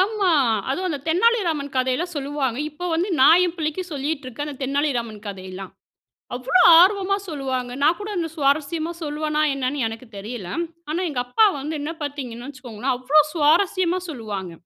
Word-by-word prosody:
ஆமா. 400 Hz, -1 st, +2 dB, 0.4 s
அதுவும் 370 Hz, +7 st, -1 dB
அந்த 290 Hz, -, -2 dB
தென்னாலிராமன் 335 Hz, -, +1 dB
கதையெல்லாம் 260 Hz, +8 st, 0 dB
சொல்லுவாங்க. 275 Hz, -3 st, -2 dB
இப்ப 355 Hz, +4 st, -6 dB
வந்து 345 Hz, +5 st, 0 dB
நான் 320 Hz, +7 st, +7 dB
என்பிள்ளைக்கு 330 Hz, 0 st, -3 dB
சொல்லிட்டிருக்கேன் 285 Hz, -1 st, -4 dB
அந்த 285 Hz, -2 st, -8 dB
தென்னாலிராமன் 255 Hz, -6 st, -1 dB
கதையெல்லாம். 190 Hz, -1 st, -7 dB, 0.6 s
அவ்வளோ 260 Hz, +8 st, +2 dB, 0.2 s
ஆர்வமா 395 Hz, +1 st, +3 dB
சொல்லுவாங்க. 260 Hz, -4 st, -3 dB
நான் 315 Hz, +4 st, +4 dB
கூட 415 Hz, 0 st, -6 dB
அந்த 335 Hz, -2 st, -1 dB
சுவாரஸ்யமா 310 Hz, +2 st, 0 dB
சொல்வேனா 305 Hz, 0 st, -1 dB
என்னன்னு 270 Hz, 0 st, -2 dB
எனக்கு 225 Hz, +3 st, -8 dB
தெரியல. 210 Hz, -1 st, -6 dB, 0.4 s
ஆனா, 325 Hz, +4 st, -1 dB
எங்க 265 Hz, -, -3 dB
அப்பா 250 Hz, -, +4 dB
வந்து 290 Hz, +3 st, -4 dB
என்ன 300 Hz, -, -3 dB
பார்த்தீங்கன்னு 260 Hz, -4 st, -5 dB
வச்சிக்கோங்களேன், 255 Hz, -2 st, -4 dB
அவ்ளோ 255 Hz, +5 st, +3 dB
சுவாரஸ்யமா 345 Hz, +3 st, +2 dB
சொல்லுவாங்க. 210 Hz, -, -5 dB
290 Hz, 145 wpm, -22 LUFS, 255-330 Hz, 0.6 s, நான்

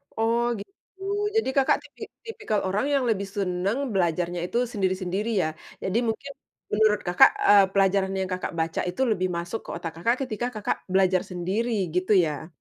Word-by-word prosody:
Oh, 230 Hz, +1 st, +1 dB, 0.2 s
gitu. 200 Hz, -, -10 dB, 0.6 s
Jadi, 445 Hz, -, +2 dB
Kakak 270 Hz, -, +4 dB
tipi -, -, -18 dB, 0.2 s
tipikal 220 Hz, -, -2 dB
orang 200 Hz, +8 st, 0 dB
yang 275 Hz, -2 st, +2 dB
lebih 200 Hz, -3 st, 0 dB
senang 195 Hz, +1 st, -1 dB, 0.2 s
belajarnya 175 Hz, -1 st, 0 dB
itu 235 Hz, -, -2 dB
sendiri-sendiri, 190 Hz, 0 st, -1 dB
ya. 155 Hz, -, 0 dB, 0.3 s
Jadi 190 Hz, +3 st, 0 dB
mungkin 225 Hz, +5 st, -3 dB, 0.4 s
menurut 210 Hz, -1 st, +3 dB
Kakak, 175 Hz, 0 st, +7 dB, 0.2 s
eee, 200 Hz, -1 st, +8 dB
pelajaran 195 Hz, -1 st, +2 dB
yang 190 Hz, -1 st, -2 dB
Kakak 185 Hz, -1 st, -3 dB
baca 160 Hz, 0 st, -1 dB
itu 180 Hz, -, -4 dB
lebih 185 Hz, -3 st, +1 dB
masuk 175 Hz, +6 st, -4 dB
ke -, -, -10 dB
otak 170 Hz, -1 st, -5 dB
Kakak, 230 Hz, +8 st, +2 dB
ketika 240 Hz, -1 st, -3 dB
Kakak 210 Hz, -, -1 dB
belajar 185 Hz, -1 st, +3 dB
sendiri 190 Hz, +7 st, -2 dB, 0.2 s
gitu 185 Hz, +3 st, 0 dB
ya? 160 Hz, -4 st, +1 dB
195 Hz, 165 wpm, -25 LUFS, 180-220 Hz, 0.6 s, eee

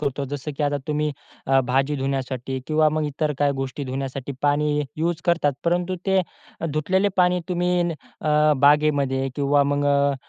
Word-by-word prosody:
करतो 140 Hz, -1 st, -2 dB
जसं 145 Hz, +1 st, -5 dB
की 150 Hz, -, -2 dB
आता 145 Hz, 0 st, +1 dB
तुम्ही 150 Hz, 0 st, 0 dB, 0.4 s
अ, 135 Hz, 0 st, +4 dB
भाजी 135 Hz, +3 st, 0 dB
धुण्यासाठी 135 Hz, -1 st, -3 dB
किंवा 155 Hz, 0 st, +3 dB
मग 155 Hz, 0 st, -1 dB
इतर 150 Hz, +1 st, -1 dB
काही 145 Hz, -1 st, +2 dB
गोष्टी 135 Hz, +1 st, -4 dB
धुण्यासाठी 135 Hz, +1 st, -4 dB
पाणी 145 Hz, +1 st, +2 dB
हे 150 Hz, -, 0 dB
युज 170 Hz, +1 st, -1 dB
करतात, 170 Hz, -5 st, +2 dB
परंतु 175 Hz, +2 st, +1 dB
ते 190 Hz, -1 st, +3 dB, 0.5 s
धुतलेले 190 Hz, +6 st, +1 dB
पाणी 180 Hz, 0 st, +3 dB
तुम्ही 180 Hz, 0 st, +1 dB
न 170 Hz, -1 st, -1 dB, 0.3 s
अ, 150 Hz, 0 st, +3 dB
बागेमध्ये 140 Hz, -2 st, +3 dB
किंवा 145 Hz, 0 st, +3 dB
मग 145 Hz, 0 st, 0 dB
अ, 140 Hz, 0 st, +3 dB
145 Hz, 170 wpm, -23 LUFS, 140-155 Hz, 0.5 s, अ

